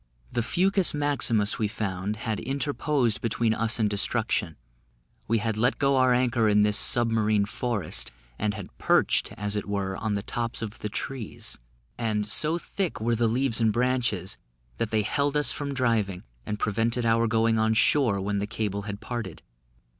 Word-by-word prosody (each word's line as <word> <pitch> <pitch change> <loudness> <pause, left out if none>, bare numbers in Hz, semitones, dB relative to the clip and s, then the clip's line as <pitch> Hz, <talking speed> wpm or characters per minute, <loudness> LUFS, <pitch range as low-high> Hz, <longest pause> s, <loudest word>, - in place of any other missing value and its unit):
The 120 - 0
fucus 185 - +1
maximus 115 -8 +1
we 110 - +1
found 100 -2 -3
had 110 -1 -3
interposed 140 -2 0
between 115 0 +1
us 110 +1 +1
and 110 -2 +2
destruction; 105 -4 0 0.7
we 115 - +2
had 110 0 -2
let 125 +4 +1
go 140 -1 +2
our 130 -1 +4
anchor 120 -2 +2
in 105 0 +4
this 105 0 +2
sub 115 +1 +6
marine 110 -2 +2
forest, 100 - -2 0.3
and 105 0 -1
had 100 -4 -9
perched, - - +2
as 105 -1 -3
it 105 - -3
were, 100 -2 -2
on 105 0 -2
the 100 - -3
tops 115 0 -3
of 110 0 -7
the 105 - -4
trees; 125 +1 -5 0.4
and, 110 -3 -1
so 155 +10 +3
thick 185 +1 -3
were 115 +2 0
the 115 0 +2
leaves 120 0 +1
and 110 -1 +3
branches, 120 -6 0 0.4
that 115 - -1
they 110 -1 +1
held 145 +6 0
us 150 - +2
from 145 -1 -4
driving, 115 -8 0 0.2
and 105 - -2
prevented 115 +4 0
our 115 0 +3
going 115 0 +2
on 110 0 +2
shore 115 -4 +3
when 100 +1 -1
the 100 - -2
cable 105 -2 -3
had 100 0 -6
parted. 115 -8 -6
110 Hz, 175 wpm, -26 LUFS, 105-125 Hz, 0.7 s, sub